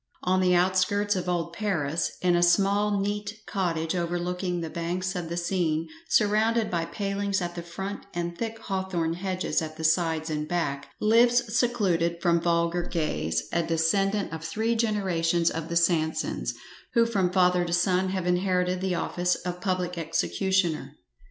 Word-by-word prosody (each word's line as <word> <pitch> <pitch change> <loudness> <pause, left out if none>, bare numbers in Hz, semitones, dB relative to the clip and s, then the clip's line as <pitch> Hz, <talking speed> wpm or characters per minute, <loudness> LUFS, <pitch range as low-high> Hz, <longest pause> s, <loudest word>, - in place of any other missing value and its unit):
On 185 +1 +2
the 180 -1 +4
outskirts 185 +3 +2
of 180 -1 -2
old 170 -1 -1
Paris, 170 -6 -1
in 180 -1 +4
a 175 - +3
small 200 +4 +3
neat 205 +2 -2
cottage 165 -4 -1
overlooking 175 +1 -2
the 165 - -4
banks 180 +3 -2
of 175 -2 -4
the 170 - -3
Seine, 170 -3 0 0.2
surrounded 220 +2 +2
by 170 -2 0
palings 200 +3 -2
at 175 -1 -3
the 175 - -5
front, 190 +4 -6
and 170 0 -3
thick 225 +3 -4
hawthorn 190 -6 -2
hedges 185 -2 -1
at 155 -1 -6
the 160 - -6
sides 160 -1 +1
and 150 0 -2
back, 145 -5 -2
lives 235 +1 +3
secluded 175 -9 +1
from 170 -1 +2
vulgar 170 0 +1
gaze 150 - -2
a 170 - +2
descendant 170 +5 +1
of 160 0 -6
three 220 +8 0
generations 185 -7 +1
of 165 0 -5
the 170 - -3
Sansons, 165 -2 0 0.4
who 230 0 +5
from 195 -6 +1
father 180 -1 +3
to 170 - -4
son 180 +1 +2
have 185 -1 -2
inherited 180 0 +1
the 190 -1 0
office 180 +1 0
of 180 0 -5
public 180 -2 -1
executioner. 165 -2 0
180 Hz, 160 wpm, -27 LUFS, 170-195 Hz, 0.4 s, who